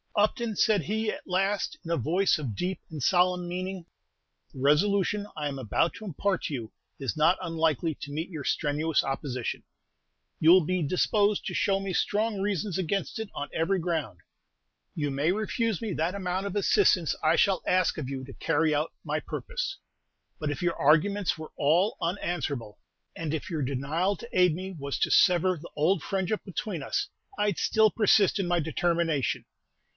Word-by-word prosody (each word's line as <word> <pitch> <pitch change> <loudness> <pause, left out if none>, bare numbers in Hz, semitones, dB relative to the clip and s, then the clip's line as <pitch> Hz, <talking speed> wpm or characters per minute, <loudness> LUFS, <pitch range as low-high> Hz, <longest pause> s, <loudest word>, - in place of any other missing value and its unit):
"Upton," 215 +2 +1
said 210 -4 +3
he, 215 +5 -1
at - - -8
last, 195 +9 0
in - - -6
a - - +3
voice 175 +10 +2
of 130 -9 -4
deep 180 - -2
and 155 -3 -7
solemn 180 +3 +2
meaning, 185 0 -4 0.7
"the - - -11
resolution 200 +8 +2
I 150 -1 -1
am 140 -1 -4
about 130 +6 0
to 220 - -9
impart 190 +1 -1
to - - -3
you 115 -5 -5 0.3
is 135 -6 -2
not 160 +4 +4
unlikely 165 -2 0
to 145 - -6
meet 160 +5 -3
your 155 -6 -6
strenuous 150 +1 +1
opposition; 135 -3 -3 0.8
you 160 - +5
will 180 -1 +7
be 185 +2 0
disposed 200 +6 +1
to - - -3
show 195 -1 +2
me 195 -1 -4
strong 210 +1 0
reasons 200 -2 -1
against 195 +5 -2
it 220 -2 -4
on 145 - -4
every 175 +4 +1
ground; 160 - -2 0.8
you 145 -2 -1
may 145 +5 +1
refuse 215 0 -1
me 220 -4 -2
that 165 +4 -1
amount 185 0 -2
of 200 - -4
assistance 200 - +3
I 155 +2 +4
shall 195 -1 +3
ask 185 -1 +2
of 140 -4 -4
you 135 -1 -4
to 135 - -10
carry 160 +1 +1
out 155 +3 -1
my - - -1
purpose; - - -4 0.6
but 150 -2 -1
if 145 - -5
your 170 -1 +1
arguments 175 +7 +3
were 155 0 -8
all 165 +8 +3
unanswerable, 155 - -3 0.4
and 160 -2 -3
if 155 - -3
your 160 -4 -2
denial 145 +9 0
to 235 - -10
aid 180 -3 +5
me 190 +1 -6
was 140 -1 -3
to - - +1
sever 180 -1 +4
the 165 +3 -11
old 165 +7 +2
friendship 195 +2 -2
between 190 -2 -4
us, - - -1 0.3
I 210 0 +2
'd 180 - -5
still 220 -1 +4
persist 205 -2 +4
in 190 - 0
my 175 0 +2
determination. 165 -2 0
175 Hz, 180 wpm, -28 LUFS, 150-195 Hz, 0.8 s, will